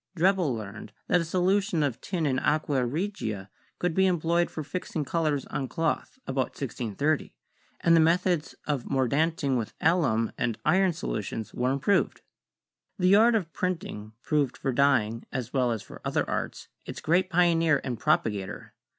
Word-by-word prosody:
Drebbel 180 -6 +3
learned 105 -1 -8 0.2
that 180 - +4
a - - -3
solution 185 0 +1
of 135 -5 -2
tin 175 -4 -2
in 130 -3 +1
aqua 145 -4 +1
regia 120 - -3 0.3
could 180 -2 0
be 190 +2 +4
employed 170 -1 +1
for 155 - -5
fixing 155 -1 -4
colors 155 -2 0
on 135 - -3
cloth 165 - -2
about 130 -1 -2
1630, 135 +3 -2 0.5
and 165 - +5
the - - +6
methods 170 0 +2
of 145 -5 -1
mordanting 140 +1 +1
with 110 - -5
alum 145 -10 +2
and 120 -2 0
iron 190 0 +4
solutions 105 - -4
were 125 +1 0
improved. 140 +9 +1 0.8
The 185 +1 +4
art 230 +2 +6
of 175 -7 -1
printing 135 - -3
proved 145 -4 0
for 135 - -1
dyeing, 120 -4 +2
as 125 -3 -4
well 125 -3 +2
as 110 -3 -3
for - - -12
other - - 0
arts, - - -3 0.2
its - - -7
great 180 +3 +2
pioneer 165 -4 +3
and 125 -4 -4
propagator. 100 -4 -1
150 Hz, 160 wpm, -27 LUFS, 125-175 Hz, 0.8 s, the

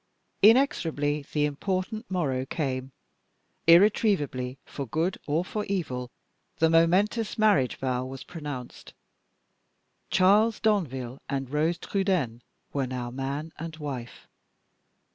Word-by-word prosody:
Inexorably 160 - +3
the 150 -1 +2
important 190 - -3
morrow 145 -9 0
came: 130 -3 -3 0.8
irretrievably, 165 - +4
for 140 -2 -6
good 165 +9 -1
or 155 +4 +1
for 210 +2 -3
evil, 130 -11 -3 0.5
the 160 0 +3
momentous 190 +7 +3
marriage 205 - +3
vow 130 -1 -1
was 130 0 -7
pronounced. 145 -7 -8 1.1
Charles 205 +4 +4
Danville 135 - -1
and 135 -2 -3
Rose 160 +3 +1
Trudaine 175 - -1 0.3
were 135 -2 0
now 125 -1 -4
man 140 +5 -4
and 160 0 -6
wife. 135 -6 -7
150 Hz, 105 wpm, -27 LUFS, 130-190 Hz, 1.1 s, irretrievably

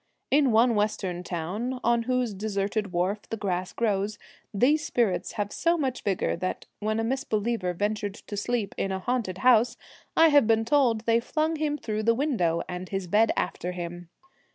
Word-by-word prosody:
In 280 -2 +4
one 230 +2 +4
western 205 -4 -1
town, 190 +9 -3
on 235 0 +3
whose 250 -3 +1
deserted 200 0 -2
wharf 185 +4 0
the 225 - -3
grass 185 -3 -2
grows, 210 -2 -1 0.3
these 285 +9 +3
spirits 230 - 0
have 205 -1 -3
so 340 +1 +1
much 265 -5 -2
vigour 195 -3 0
that, 185 - -3
when 215 +1 -1
a - - 0
misbeliever 225 -5 -1
ventured 205 +1 -2
to 210 - -8
sleep 210 0 -1
in 195 - -1
a 190 - -1
haunted 215 -3 -2
house, 240 +2 +4 0.4
I 325 0 +7
have 285 -6 +5
been 225 0 +3
told 240 -4 +3
they 230 0 +3
flung 310 +6 -1
him 300 -1 -1
through 215 -5 -3
the 230 +1 +3
window, 215 - 0
and 180 +1 -6
his 195 -1 -3
bed 210 +5 +3
after 180 +1 -2
him. 175 -1 -6
215 Hz, 175 wpm, -27 LUFS, 195-245 Hz, 0.4 s, I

